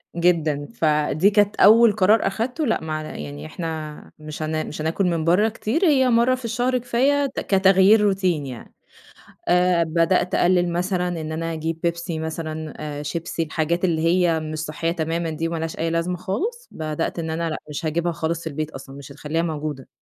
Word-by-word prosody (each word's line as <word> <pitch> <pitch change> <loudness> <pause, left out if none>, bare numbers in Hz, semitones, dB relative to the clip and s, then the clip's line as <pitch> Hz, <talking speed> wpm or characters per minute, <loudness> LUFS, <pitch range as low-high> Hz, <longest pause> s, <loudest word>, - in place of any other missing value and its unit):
جدًا، 160 -4 +1
فدي 155 +1 +2
كانت 205 0 +2
أول 225 +2 +7
قرار 210 +2 +3
أخدته 250 +10 -2
لأ 225 - 0
معنا 155 -1 -4
يعني 75 0 -7
إحنا 155 - -6
مش 155 0 -7
هنا 155 0 -1
مش 155 - -6
هناكل 165 +5 0
من 170 -3 0
بره 190 +6 +4
كتير 235 - -1
هي 265 -5 +4
مرة 240 +2 +3
في 250 -2 -9
الشهر 245 +3 0
كفاية 260 +4 +1
ت - - -1
كتغيير 195 +2 +5
روتين 185 -7 +1
يعني 125 -3 -9 0.7
آآ، 180 -1 +3
بدأت 170 +3 +1
أقلل 175 -1 +3
مثلًا 180 0 0
إن 155 0 -5
أنا 165 +1 -3
أجيب 160 +1 -3
بيبسي 170 -1 -2
مثلًا، 160 -1 -5 0.3
شيبسي 165 +2 -3
الحاجات 165 +3 -1
اللي 160 -3 0
هي 170 -1 +2
مش 155 0 -5
صحية 155 +2 -2
تمامًا 165 0 -2
دي 160 +1 -2
وما 165 0 -3
لهاش 160 0 -4
أي 165 - 0
لازمة 165 +2 -1
خالص، 450 - -3
بدأت 155 +2 -3
إن 160 -1 -3
أنا 165 +1 -2
لأ 155 - -3
مش 150 +2 -5
هاجيبها 170 +2 0
خالص 165 +1 -3
في - - -5
البيت 155 +1 -4
أصلًا، 135 0 -10
مش 140 0 -10
هتخليها 150 +3 -2
موجودة. 150 -5 -4
165 Hz, 185 wpm, -22 LUFS, 155-190 Hz, 0.7 s, أول